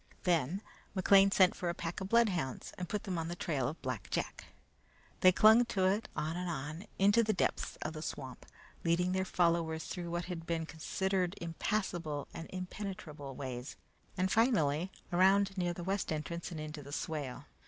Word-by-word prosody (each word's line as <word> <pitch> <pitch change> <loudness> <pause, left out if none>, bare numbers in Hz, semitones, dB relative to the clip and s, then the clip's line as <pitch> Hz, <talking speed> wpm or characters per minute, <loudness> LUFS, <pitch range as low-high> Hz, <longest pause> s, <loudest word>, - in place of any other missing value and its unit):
Then 175 +2 +1 0.3
McLean 195 +1 +6
sent 190 -2 +5
for 175 - -2
a 170 - -2
pack 170 +2 -4
of 190 - -4
bloodhounds 195 - +1
and 180 -2 -5
put 210 - -2
them 185 -4 -2
on 165 - -2
the 175 - -4
trail 145 -8 -1
of 155 +5 -5
Black 130 -5 -4
Jack. - - -3 0.7
They 185 - +7
clung 220 +5 +7
to 190 -5 0
it, 200 +4 +1
on 160 +2 -2
and 180 0 -3
on, 155 +5 -5
into 205 +4 +5
the 215 -1 +1
depths 185 - 0
of 155 - -3
the 155 - -6
swamp, 130 -5 -6 0.4
leading 175 +2 +2
their 190 0 +1
followers 170 -3 +1
through 175 -2 -5
what 175 +1 -2
had 170 -2 -6
been 165 -1 -1
considered 185 +3 -1
impassable 170 -3 -2
and 165 - -7
impenetrable 185 -7 -6
ways, 125 -1 -5 0.4
and 185 0 +1
finally, 185 - +3 0.2
around 195 +2 +4
near 175 -2 0
the 175 0 -6
west 195 0 -1
entrance 165 +2 -3
and 165 - -6
into 155 0 -6
the 140 0 -10
swale. 145 -3 -4
175 Hz, 180 wpm, -33 LUFS, 155-190 Hz, 0.7 s, They